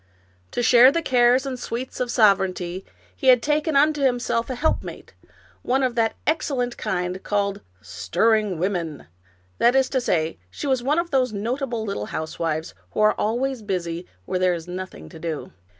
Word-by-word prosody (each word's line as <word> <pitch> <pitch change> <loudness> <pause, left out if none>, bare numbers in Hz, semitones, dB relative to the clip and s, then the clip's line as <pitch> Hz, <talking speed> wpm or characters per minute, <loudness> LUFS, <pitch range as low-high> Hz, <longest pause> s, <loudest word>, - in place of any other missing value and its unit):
To 245 - -2
share 245 +2 +7
the 335 +3 -1
cares 250 0 +4
and 260 -2 -4
sweets 245 +2 -5
of 250 -1 -1
sovereignty 190 -5 +2 0.3
he 265 - -3
had 250 -2 +6
taken 300 +1 +1
unto 295 +1 +3
himself 245 -2 0
a 255 - -2
helpmate, 315 +6 -2 0.5
one 265 +2 +1
of 255 -2 +1
that 230 -2 +1
excellent 270 -6 0
kind 180 +1 -3
called 200 -1 -1 0.2
" - - -36 0.2
stirring 215 0 +2
women 170 - -2 0.3
"; 90 +1 -36
that 240 +2 +4
is 265 -1 +3
to 260 - 0
say, 160 -7 0
she - - -7
was 260 -3 +1
one 285 +5 +1
of 340 0 -1
those 255 -4 +1
nota 240 +7 -2
ble 230 -3 -3
little 150 - -3
housewives 160 0 -3 0.2
who - - -3
are 215 0 +5
always 245 +3 -1
busy 175 -4 -3 0.2
where 185 - -2
there 185 -1 +2
is 165 0 -8
nothing 180 - -7
to - - -12
do. 160 -2 -5
230 Hz, 180 wpm, -23 LUFS, 180-260 Hz, 0.5 s, share